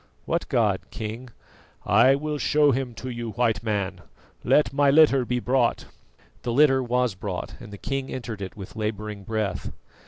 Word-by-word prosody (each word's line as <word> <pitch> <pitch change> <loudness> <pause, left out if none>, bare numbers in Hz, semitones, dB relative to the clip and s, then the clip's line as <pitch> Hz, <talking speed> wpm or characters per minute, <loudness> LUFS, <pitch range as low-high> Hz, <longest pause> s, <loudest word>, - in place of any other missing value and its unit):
"What - - -1
god, - - +1
King?" 115 +4 -6 0.6
"I 135 +1 +5
will 150 +1 -3
show 150 0 +3
him 130 -2 -2
to 130 - -6
you, 120 -2 -5
White 120 -2 +1
Man. 100 -5 -2 0.4
Let 150 - +3
my 140 0 +4
litter 140 -3 +5
be 125 +1 -1
brought." 125 0 +1 0.6
The 120 - -2
litter 135 +1 +4
was 125 -2 0
brought 95 -1 -5
and 105 - -11
the 100 - -8
king 135 +4 -4
entered 115 -5 -5
it 95 +1 -7
with 95 0 -9
labouring 105 -2 -4
breath. 105 -3 -2
120 Hz, 165 wpm, -25 LUFS, 105-135 Hz, 0.6 s, I